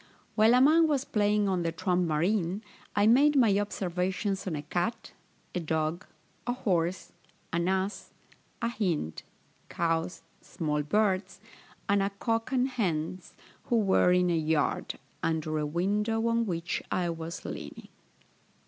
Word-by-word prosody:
While 220 +2 +5
a 250 - +5
man 320 +4 +6
was 285 -3 0
playing 210 -1 +2
on 185 -2 +1
the 165 -1 -1
trump 180 +1 0
marine, 175 +5 0 0.3
I 205 - +4
made 280 +7 +5
my 220 -7 +4
observations 190 0 -2
on 170 - -1
a 145 - -4
cat, 200 +9 -2 0.4
a 180 - -1
dog, 160 +1 -2 0.4
a 245 - +1
horse, 180 -7 -1 0.4
an 170 +1 +1
ass, 190 +2 -1 0.5
a 235 - +2
hind, 175 - -2 0.5
cows, 165 +1 -1 0.2
small 150 -3 -2
birds, 190 +4 0 0.5
and 200 0 +3
a 195 - +1
cock 225 +4 -2
and 255 -1 +2
hens, 180 -7 -2 0.3
who 240 - 0
were 195 -4 +4
in 180 -1 +3
a - - +2
yard, 160 -1 0 0.2
under 155 -1 -1
a 150 - -1
window 210 +7 0
on 230 0 +1
which 170 -2 -2
I 175 -2 0
was 165 +1 -6
leaning. - - -7
185 Hz, 145 wpm, -29 LUFS, 165-215 Hz, 0.5 s, man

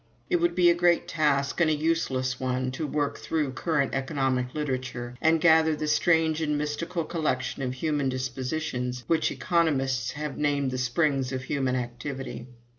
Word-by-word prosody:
"It 355 - +4
would 345 0 +1
be 175 -1 +6
a - - +4
great 175 0 +2
task 145 -1 +1
and 165 - +4
a 155 - +2
useless 130 -5 0
one 130 0 -1
to 150 +4 -3
work 145 -1 -1
through 150 -4 -1
current 145 +1 0
economic 135 -2 -1
literature 125 -4 -3
and 160 0 +4
gather 160 -1 +5
the 155 0 -3
strange 160 0 +2
and 150 -2 0
mystical 165 +4 -2
collection 150 -6 -2
of 130 -1 -2
human 145 -1 0
dispositions 130 0 -3
which 165 +5 +2
economists 140 -7 0
have 150 0 -5
named 145 -2 +1
the 130 - -3
springs 135 +1 +1
of 130 -1 -3
human 130 -1 -1
activity. 125 +1 -5
145 Hz, 165 wpm, -27 LUFS, 130-160 Hz, -, be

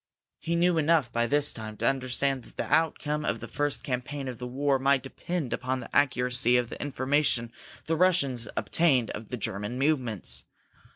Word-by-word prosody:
He 170 - -2
knew 170 0 +3
enough, 155 -5 +2
by 120 0 +1
this 145 +2 +2
time, 110 -1 -7
to 115 - 0
understand 135 0 0
that - - -19
the - - -2
outcome 150 -1 +1
of - - -1
the - - -7
first 145 -1 -1
campaign 135 +2 -4
of 125 -3 -6
the 125 - -5
war 135 +2 +1
might 135 0 +2
depend 150 +1 -4
upon 130 +1 -2
the - - -9
accuracy 125 -2 +4
of 120 -1 -1
the - - -7
information 135 -3 0 0.3
the 165 - 0
Russians 140 - +2
obtained 135 -9 +2
of 105 0 -8
the 125 - -4
German 105 +2 -3
movements. 130 - 0
135 Hz, 180 wpm, -28 LUFS, 125-145 Hz, 0.3 s, accuracy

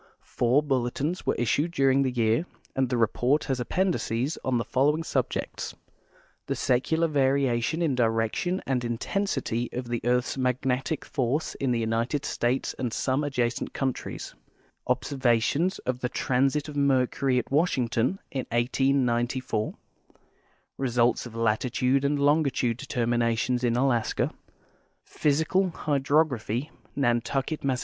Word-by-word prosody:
Four 125 +5 +2
bulletins 140 +5 -1
were - - +2
issued 140 +7 +1
during 135 -2 +3
the 135 - +2
year 120 +6 +1 0.3
and 130 -2 +1
the 125 - 0
report 120 +6 +2
has 130 -2 -2
appendices 140 -2 0
on 130 -2 +1
the 115 - 0
following 145 +7 +2
subjects: - - -2 0.7
The - - -1
Secular 160 +7 +1
Variation 140 +1 +1
in 155 -5 +1
Direction 115 - 0
and 130 -2 0
Intensity 120 - -1
of 125 -1 -4
the 120 -1 -2
Earth's 125 +2 0
Magnetic 130 +3 -1
Force 135 +4 -1
in 135 - -2
the 120 - +1
United 115 +5 -1
States 125 +2 -1
and 125 -3 -1
Some 130 +5 0
Adjacent 125 -4 -1
Countries; 135 -2 -3 0.5
Ob 125 +1 +2
servations 135 +6 +1
of 125 0 -1
the 125 - -2
Transit 135 +4 +1
of 150 - -8
Mercury 135 -1 +2
at 125 - -2
Washington 135 -1 +1
in 130 -2 -3
1894; 120 -2 0 1.0
Results 120 -2 +1
of 115 - -12
Latitude 125 +4 +1
and 145 +1 +1
Longitude 140 -5 +2
Determinations 120 0 0
in 120 -1 +2
Alaska; 120 -3 +1 0.7
Physical 160 +6 +1
Hydrog 150 0 +2
raphy, 125 +3 -3 0.2
Nantucket, 135 +3 0
Mass. 130 -2 0
130 Hz, 130 wpm, -27 LUFS, 120-140 Hz, 1.0 s, during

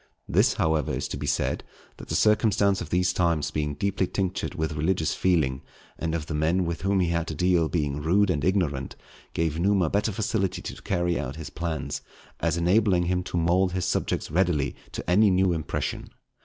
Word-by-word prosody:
This, - - +3
however, 80 -3 +1
is - - -2
to - - -4
be - - -4
said, - - 0 0.3
that - - -10
the - - -2
circumstance 105 -2 +3
of 85 - -6
these 90 0 +2
times 85 -4 +1
being 75 -1 -2
deeply 95 +3 0
tinctured 95 -1 -2
with 80 -2 -1
religious 80 +2 0
feeling, 75 -8 +1 0.4
and 80 0 -1
of 80 -2 -3
the 80 - -5
men 80 +5 +1
with 85 -1 -3
whom 95 0 +2
he 90 - +1
had 85 -1 -1
to 80 - -4
deal 85 0 +2
being 75 -3 -1
rude 95 +5 +3
and 75 -5 -1
ignorant, 80 -8 0 0.4
gave 80 -1 0
Numa 95 -2 +2
better 105 +2 +1
facility 105 -1 -1
to - - -7
carry 85 -2 0
out 70 -2 -4
his 80 -3 -7
plans, 80 -3 -3 0.4
as 85 -1 0
enabling 90 +1 +3
him 90 +1 0
to 90 - -3
mould 90 +2 +2
his 90 -1 -1
subjects 95 - -1
readily 80 -5 +1 0.2
to - - -6
any 100 +5 +5
new 95 -1 +3
impression. 80 -2 -3
85 Hz, 195 wpm, -26 LUFS, 80-95 Hz, 0.4 s, any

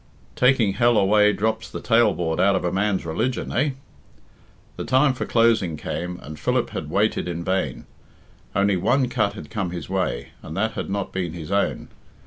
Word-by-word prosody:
Taking 125 -6 +3
hell 120 +1 +3
away 105 +1 +5
drops 110 +1 -1
the - - -6
tailboard 100 -9 +2
out 100 +1 +4
of 95 - -1
a 90 - 0
man's 95 -1 0
religion, 110 +11 -2
eh?" 140 +2 +1 1.0
The - - -5
time 135 +1 +3
for 130 - -4
closing 115 -9 +2
came, 90 +4 -4
and 75 +1 -9
Philip - - 0
had - - -5
waited - - +1
in 85 -1 -4
vain. 95 +2 -2 0.7
Only 100 0 +3
one 125 +8 +2
cut 110 -5 0
had 75 - -10
come 95 -5 -2
his 85 -1 -7
way, 85 -11 -1
and 80 - -8
that 110 +3 +1
had - - -5
not 100 0 -2
been 90 -4 -2
his 85 0 -7
own. 100 0 0
100 Hz, 180 wpm, -23 LUFS, 90-115 Hz, 1.0 s, away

